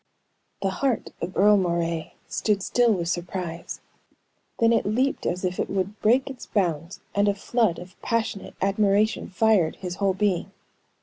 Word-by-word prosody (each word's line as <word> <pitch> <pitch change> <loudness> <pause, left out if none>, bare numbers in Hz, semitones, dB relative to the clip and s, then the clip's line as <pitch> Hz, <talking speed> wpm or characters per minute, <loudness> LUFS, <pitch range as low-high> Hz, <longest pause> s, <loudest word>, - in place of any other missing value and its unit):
The 195 - +1
heart 260 +3 -1
of 175 +2 -4
Earle 210 +1 +6
Moray 170 -3 -1
stood 205 -3 0
still 240 +2 +3
with 175 -5 0
surprise, 175 -1 -4 0.8
then 230 0 +4
it - - +2
leaped 255 +7 0
as 180 +2 -1
if 180 0 -2
it - - -1
would 195 +2 -2
break 245 +5 +3
its 265 -3 -8
bounds, 170 -3 -1
and 200 +1 +2
a 200 - +2
flood 215 -2 +1
of 180 +1 -12
passionate 225 -3 -2
admiration 200 +2 +2
fired 195 -5 +3
his 180 -1 -6
whole 195 -2 +1
being. 195 -3 0
195 Hz, 160 wpm, -25 LUFS, 180-215 Hz, 0.8 s, Earle